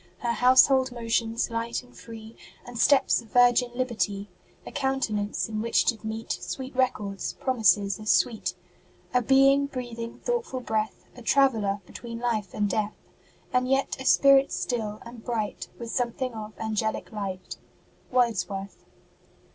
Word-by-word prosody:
Her 235 Hz, -, -1 dB
household 260 Hz, +2 st, +5 dB
motions, 230 Hz, -1 st, -1 dB
light 230 Hz, +1 st, -2 dB
and 250 Hz, -, -20 dB
free, 225 Hz, -1 st, -11 dB, 0.3 s
And 240 Hz, -1 st, -8 dB
steps 280 Hz, +1 st, +4 dB
of 230 Hz, -, -16 dB
Virgin 245 Hz, +1 st, +4 dB
liberty; 210 Hz, -6 st, -2 dB, 0.3 s
A -, -, -8 dB
countenance 265 Hz, -7 st, -1 dB
in 215 Hz, -1 st, -3 dB
which 230 Hz, +1 st, +2 dB
did 225 Hz, -2 st, 0 dB
meet 220 Hz, +1 st, -4 dB
Sweet 260 Hz, 0 st, -5 dB
records, 210 Hz, -6 st, -1 dB
promises 205 Hz, -5 st, +2 dB
as 215 Hz, 0 st, -5 dB
sweet; 225 Hz, -7 st, +1 dB, 0.6 s
A 250 Hz, -, +4 dB
Being 275 Hz, +3 st, +4 dB
breathing 235 Hz, -3 st, -6 dB
thoughtful 470 Hz, -, -2 dB
breath, 220 Hz, -3 st, -2 dB
A 245 Hz, -, -11 dB
traveller 225 Hz, -6 st, +2 dB
between 230 Hz, +5 st, -8 dB
life 230 Hz, -4 st, -1 dB
and 210 Hz, -1 st, +1 dB
death 210 Hz, +1 st, -1 dB, 0.6 s
And 255 Hz, 0 st, +2 dB
yet 270 Hz, +1 st, +1 dB
a 265 Hz, -, -6 dB
Spirit 275 Hz, 0 st, +5 dB
still, 215 Hz, -4 st, -3 dB
and 235 Hz, -1 st, -11 dB
bright 225 Hz, -4 st, -3 dB
With 235 Hz, -1 st, -6 dB
something 250 Hz, 0 st, -1 dB
of 215 Hz, -1 st, -7 dB
angelic 220 Hz, 0 st, -2 dB
light. 195 Hz, -4 st, -5 dB, 0.5 s
WORDSWORTH. 200 Hz, -5 st, -1 dB
230 Hz, 140 wpm, -26 LUFS, 215-255 Hz, 0.6 s, household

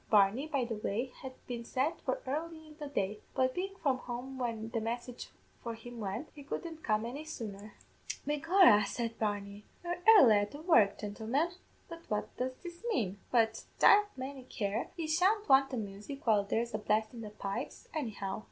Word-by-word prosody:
Barney, 210 Hz, +7 st, +4 dB
by 280 Hz, -5 st, 0 dB
the 235 Hz, -, -3 dB
way, 230 Hz, +5 st, -2 dB
had 265 Hz, -1 st, -6 dB
been 240 Hz, -1 st, -5 dB
sent 275 Hz, +8 st, -1 dB
for 260 Hz, -, -2 dB
early 315 Hz, +4 st, -4 dB
in 305 Hz, -1 st, -14 dB
the 295 Hz, -, -4 dB
day, 210 Hz, -6 st, -2 dB, 0.2 s
but 260 Hz, -1 st, +2 dB
bein' 390 Hz, +4 st, -3 dB
from 275 Hz, -8 st, 0 dB
home 255 Hz, +2 st, -6 dB
when 225 Hz, -3 st, -2 dB
the 230 Hz, -1 st, -2 dB
message 240 Hz, +2 st, -4 dB, 0.3 s
for 235 Hz, -1 st, -4 dB
him 240 Hz, +1 st, -10 dB
went, 205 Hz, +9 st, -4 dB
he 295 Hz, -, -11 dB
couldn't 320 Hz, +3 st, -6 dB
come 215 Hz, 0 st, +1 dB
any 270 Hz, +6 st, -5 dB
sooner. 210 Hz, -8 st, -7 dB, 0.5 s
"'Begorra,' 295 Hz, -, +5 dB
said 230 Hz, -1 st, -3 dB
Barney, 205 Hz, -1 st, -2 dB, 0.2 s
'you're 350 Hz, 0 st, -3 dB
airly 280 Hz, -, +9 dB
at 205 Hz, 0 st, +1 dB
the 290 Hz, -, -9 dB
work, 230 Hz, -, +5 dB
gintlemen! 225 Hz, +10 st, -1 dB, 0.4 s
but 335 Hz, 0 st, -9 dB
what 210 Hz, -1 st, -2 dB
does 255 Hz, +1 st, -2 dB
this 345 Hz, +2 st, -9 dB
mane? 200 Hz, -, -1 dB
But, 225 Hz, -2 st, +2 dB
divle 415 Hz, 0 st, +7 dB
may 265 Hz, +1 st, -5 dB
care, 205 Hz, +1 st, -2 dB
yez 315 Hz, -2 st, 0 dB
shan't 415 Hz, +4 st, +3 dB
want 270 Hz, 0 st, +6 dB
the 255 Hz, -, -3 dB
music 210 Hz, +6 st, -6 dB
while 210 Hz, -3 st, +4 dB
there's 230 Hz, +3 st, -1 dB
a 215 Hz, -, -1 dB
blast 215 Hz, +2 st, +1 dB
in 235 Hz, -, -7 dB
the 215 Hz, -, -6 dB
pipes, 205 Hz, +5 st, -5 dB
anyhow!' 210 Hz, -9 st, -3 dB
245 Hz, 190 wpm, -33 LUFS, 215-295 Hz, 0.5 s, airly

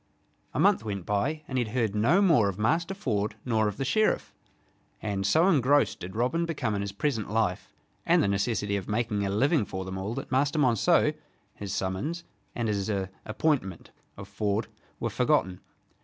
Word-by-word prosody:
A -, -, 0 dB
month 190 Hz, -, +4 dB
went 100 Hz, -5 st, -4 dB
by 140 Hz, +10 st, -1 dB
and 130 Hz, -1 st, -1 dB
he -, -, +2 dB
had 110 Hz, +1 st, -7 dB
heard 115 Hz, -5 st, +1 dB
no 140 Hz, -, +3 dB
more 145 Hz, -, +4 dB
of 95 Hz, -, -5 dB
Master 165 Hz, -, 0 dB
Ford 105 Hz, -, -1 dB
nor 110 Hz, -3 st, +2 dB
of 105 Hz, -, -4 dB
the 135 Hz, -, -2 dB
Sheriff, 215 Hz, +11 st, +1 dB, 0.7 s
and 100 Hz, -2 st, -2 dB
so 160 Hz, -, +4 dB
engrossed 145 Hz, -4 st, +3 dB
did 90 Hz, +3 st, -8 dB
Robin 125 Hz, +9 st, +1 dB
become 140 Hz, -9 st, -2 dB
in 100 Hz, -, -1 dB
his 100 Hz, 0 st, -3 dB
present 110 Hz, -1 st, -2 dB
life 105 Hz, -4 st, -1 dB, 0.3 s
and -, -, +4 dB
the -, -, +2 dB
necessity 100 Hz, 0 st, 0 dB
of 95 Hz, -, -6 dB
making 105 Hz, -1 st, 0 dB
a -, -, -2 dB
living 135 Hz, -, +2 dB
for 95 Hz, -2 st, -5 dB
them 95 Hz, 0 st, -5 dB
all 100 Hz, +5 st, -3 dB
that -, -, -6 dB
Master 140 Hz, +4 st, +1 dB
Monceux, 125 Hz, -7 st, +3 dB, 0.4 s
his 100 Hz, -2 st, -7 dB
summons, 100 Hz, -, -2 dB, 0.3 s
and 120 Hz, -2 st, -1 dB
his 100 Hz, -1 st, -1 dB, 0.4 s
"appointment" 110 Hz, -, -1 dB, 0.3 s
of 100 Hz, -1 st, -8 dB
Ford 105 Hz, +2 st, -2 dB, 0.3 s
were -, -, -2 dB
forgotten. 90 Hz, -1 st, +1 dB
110 Hz, 185 wpm, -28 LUFS, 100-140 Hz, 0.7 s, month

